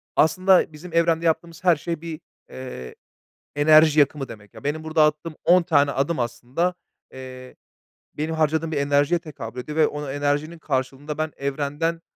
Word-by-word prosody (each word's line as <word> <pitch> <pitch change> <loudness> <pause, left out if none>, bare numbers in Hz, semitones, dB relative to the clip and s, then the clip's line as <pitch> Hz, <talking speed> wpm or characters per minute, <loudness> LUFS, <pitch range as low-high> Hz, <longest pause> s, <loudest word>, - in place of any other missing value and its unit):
aslında 185 +2 +3
bizim 165 +3 -11
evrende 165 0 +2
yaptığımız 165 0 -1
her 175 -2 +5
şey 165 +1 -5
bir, 165 -2 -7 0.3
eee, 125 - -8 0.6
enerji 155 +1 +6
yakımı 140 -1 +2
demek. 105 -2 -13
Ya, - - -13
benim 155 +2 -2
burada 160 0 +2
attığım 150 +1 -2
10 180 0 +5
tane 145 -4 +3
adım 140 +2 -1
aslında, 125 +9 -2 0.4
eee, 130 -1 -10 0.6
benim 155 +2 -3
harcadığım 160 +1 0
bir 150 - -2
enerjiye 145 +4 +2
tekabül 125 -7 -8
ediyor 150 +5 -6
ve 155 - +5
o 150 -1 -5
enerjinin 145 +4 -1
karşılığında 140 +1 -3
ben 155 0 -2
evrenden 145 +4 -2
150 Hz, 160 wpm, -23 LUFS, 140-165 Hz, 0.6 s, enerji